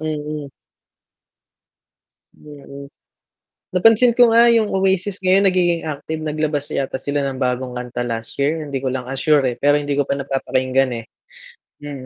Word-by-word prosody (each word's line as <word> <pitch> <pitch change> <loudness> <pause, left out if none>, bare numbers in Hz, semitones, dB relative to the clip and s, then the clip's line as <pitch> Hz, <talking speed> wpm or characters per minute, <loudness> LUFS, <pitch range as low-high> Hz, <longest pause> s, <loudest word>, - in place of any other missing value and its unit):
mm. 150 -1 -4 1.9
Mm. 140 -1 -12 0.8
Napansin 225 +6 +4
ko 240 -2 +7
nga 235 +1 +6
yung 230 -2 +3
Oasis 190 0 0
ngayon 190 +2 +4
nagiging 175 -3 +2
active 155 +1 -5
naglabas 150 -1 -2
yata 135 -1 -2
sila 145 0 -2
ng 135 -1 -3
bagong 125 -1 -2
kanta 125 0 -5
last 115 -1 -5
year, 150 +2 -1
hindi 135 -2 -4
ko 130 - -1
lang, 130 -1 -4
ah, 135 - -5
sure 145 +1 +2
eh, 125 - -1
pero 145 +3 +2
hindi 145 -1 -3
ko 145 - +2
pa 140 0 -3
napapakinggan 130 -1 0
eh. - - -17 0.7
Mm, 145 0 -9
145 Hz, 155 wpm, -19 LUFS, 135-175 Hz, 1.9 s, ko